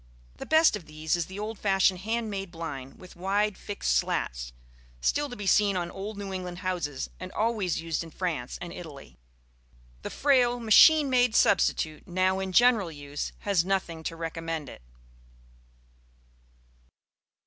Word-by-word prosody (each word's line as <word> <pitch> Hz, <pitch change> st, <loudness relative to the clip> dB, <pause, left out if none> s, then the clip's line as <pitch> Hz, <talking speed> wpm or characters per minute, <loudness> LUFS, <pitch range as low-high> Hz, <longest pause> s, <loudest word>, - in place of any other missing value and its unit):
The -, -, -8 dB
best 315 Hz, -5 st, +5 dB
of 185 Hz, -6 st, -8 dB
these 155 Hz, +2 st, -1 dB
is 170 Hz, -2 st, -2 dB
the 190 Hz, -, -9 dB
old 215 Hz, +1 st, -5 dB
fashioned 195 Hz, -2 st, +2 dB
hand 220 Hz, +2 st, -2 dB
made 195 Hz, -1 st, -4 dB
blind, 150 Hz, -6 st, -7 dB
with 185 Hz, -, -13 dB
wide 200 Hz, +3 st, 0 dB
fixed 190 Hz, -, -2 dB
slats, -, -, -1 dB, 0.5 s
still 290 Hz, -, 0 dB
to 245 Hz, -, -7 dB
be 205 Hz, -, -6 dB
seen 200 Hz, +1 st, +3 dB
on 175 Hz, -1 st, -3 dB
old 200 Hz, +2 st, -6 dB
New 200 Hz, -1 st, -5 dB
England 180 Hz, -1 st, -5 dB
houses 165 Hz, -7 st, -3 dB
and 185 Hz, 0 st, -7 dB
always 215 Hz, -6 st, 0 dB
used 165 Hz, 0 st, -2 dB
in 165 Hz, -, -10 dB
France 160 Hz, -7 st, -3 dB
and 175 Hz, -1 st, -7 dB
Italy: 150 Hz, -, -11 dB, 0.8 s
the -, -, -5 dB
frail 250 Hz, -4 st, +2 dB
machine 285 Hz, +7 st, +7 dB
made 250 Hz, -3 st, +2 dB
substitute 155 Hz, -4 st, +2 dB
now 185 Hz, +1 st, +1 dB
in 190 Hz, 0 st, -3 dB
general 225 Hz, -4 st, +4 dB
use 145 Hz, -1 st, -5 dB
has 200 Hz, -5 st, +2 dB
nothing 185 Hz, -3 st, -2 dB
to 165 Hz, -, -3 dB
recommend 165 Hz, -3 st, -4 dB
it. -, -, -12 dB
185 Hz, 155 wpm, -27 LUFS, 165-210 Hz, 0.8 s, machine